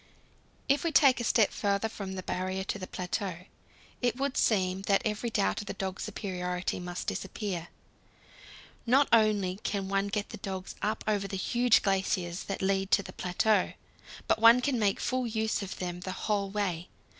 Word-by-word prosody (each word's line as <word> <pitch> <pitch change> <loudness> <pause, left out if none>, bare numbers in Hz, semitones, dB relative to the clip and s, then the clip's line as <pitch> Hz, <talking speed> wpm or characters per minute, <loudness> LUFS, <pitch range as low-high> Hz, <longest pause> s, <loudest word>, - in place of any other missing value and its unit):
If 280 +1 +2
we 335 - 0
take 275 -4 +5
a - - -2
step 220 -2 +3
farther, 200 +1 0
from 200 -3 -6
the 185 -1 -5
Barrier 185 +1 -2
to 205 - -3
the 185 - -6
plateau, 180 -1 -3 0.6
it 245 -1 +1
would 275 +1 -2
seem 190 -3 +2
that 195 - +3
every 215 +2 -1
doubt 95 - 0
of 205 - -10
the - - -4
dog's 190 0 -4
superiority 180 -4 -3
must 180 0 -5
disappear. 185 -6 -3 1.2
Not 270 +4 +5
only 210 -5 +3
can 195 -2 -2
one 195 0 +1
get 205 +1 -2
the - - -7
dogs 190 -3 -5
up 215 +2 -1
over 205 -2 +1
the 195 - -4
huge 240 +3 +3
glaciers 190 -3 0
that 195 -1 -4
lead 195 0 +1
to 200 - +4
the - - -10
plateau, 185 +3 +1 0.5
but - - +2
one 230 +2 +8
can 250 -1 0
make 205 -2 +2
full 255 -1 -1
use 220 -1 -1
of 195 -2 -6
them 175 -1 -4
the 185 +1 -5
whole 200 -2 0
way. 190 -4 -2
200 Hz, 180 wpm, -30 LUFS, 185-220 Hz, 1.2 s, one